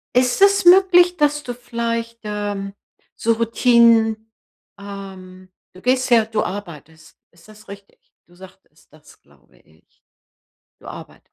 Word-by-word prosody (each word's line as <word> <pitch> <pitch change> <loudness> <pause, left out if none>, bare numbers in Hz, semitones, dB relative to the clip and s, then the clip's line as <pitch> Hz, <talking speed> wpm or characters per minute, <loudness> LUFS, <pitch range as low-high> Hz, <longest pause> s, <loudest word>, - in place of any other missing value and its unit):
ist 250 +6 +1
es 395 0 +4
möglich, 355 -1 +5
dass 295 -1 0
du 245 - -6
vielleicht, 230 -1 -5
ähm, 205 -2 -5 0.4
so 230 - 0
Routinen, 230 -1 +2 0.5
ähm 190 -2 -11 0.2
du 185 - -16
gehst 255 +2 0
ja 235 -2 +4
du 220 0 -3
arbeitest. 160 -5 -9
Ist 170 +5 -22
das 215 0 -18
richtig? 200 0 -14 0.3
Du 175 - -25
sagtest 185 -4 -19
das, 155 -1 -20
glaube - - -28
ich. 80 +4 -31 0.7
Du - - -18
arbeitest. - - -13
220 Hz, 135 wpm, -19 LUFS, 190-245 Hz, 0.7 s, möglich